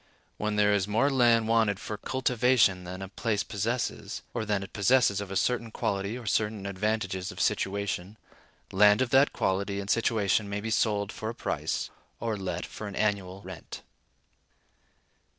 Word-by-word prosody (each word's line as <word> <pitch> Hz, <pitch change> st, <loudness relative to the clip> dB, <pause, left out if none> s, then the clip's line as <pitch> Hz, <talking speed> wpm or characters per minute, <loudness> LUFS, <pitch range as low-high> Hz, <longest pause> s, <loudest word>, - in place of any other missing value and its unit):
When 105 Hz, 0 st, -1 dB
there 105 Hz, 0 st, +4 dB
is 100 Hz, -2 st, +1 dB
more 115 Hz, +8 st, +2 dB
land 120 Hz, -4 st, +4 dB
wanted 110 Hz, -3 st, +2 dB
for 105 Hz, -, -5 dB
cultivation 125 Hz, -6 st, +2 dB
than 95 Hz, +2 st, -6 dB
a -, -, -6 dB
place 105 Hz, +2 st, -1 dB
possesses, 115 Hz, +4 st, -3 dB
or 115 Hz, -2 st, -2 dB
than 105 Hz, -2 st, 0 dB
it 95 Hz, -, -11 dB
possesses 105 Hz, -1 st, +3 dB
of 100 Hz, -, -6 dB
a 95 Hz, -, -5 dB
certain 115 Hz, +2 st, 0 dB
quality 100 Hz, 0 st, -2 dB
and 120 Hz, -3 st, -8 dB
certain 105 Hz, -1 st, 0 dB
advantages 100 Hz, -1 st, -2 dB
of 90 Hz, -, -10 dB
situation, 100 Hz, 0 st, -1 dB, 0.5 s
land 105 Hz, +5 st, +5 dB
of 120 Hz, -, -5 dB
that 135 Hz, +2 st, +5 dB
quality 100 Hz, +1 st, -1 dB
and 100 Hz, 0 st, -2 dB
situation 110 Hz, -3 st, +1 dB
may 100 Hz, 0 st, -2 dB
be 110 Hz, +2 st, -4 dB
sold 105 Hz, -2 st, +1 dB
for 110 Hz, -, -5 dB
a 115 Hz, -, -6 dB
price, -, -, -2 dB, 0.3 s
or 115 Hz, -1 st, -1 dB
let 90 Hz, -3 st, -4 dB
for 110 Hz, -, -7 dB
an 100 Hz, -, -7 dB
annual 100 Hz, -2 st, -1 dB
rent. 95 Hz, -3 st, -9 dB
105 Hz, 170 wpm, -28 LUFS, 100-115 Hz, 0.5 s, land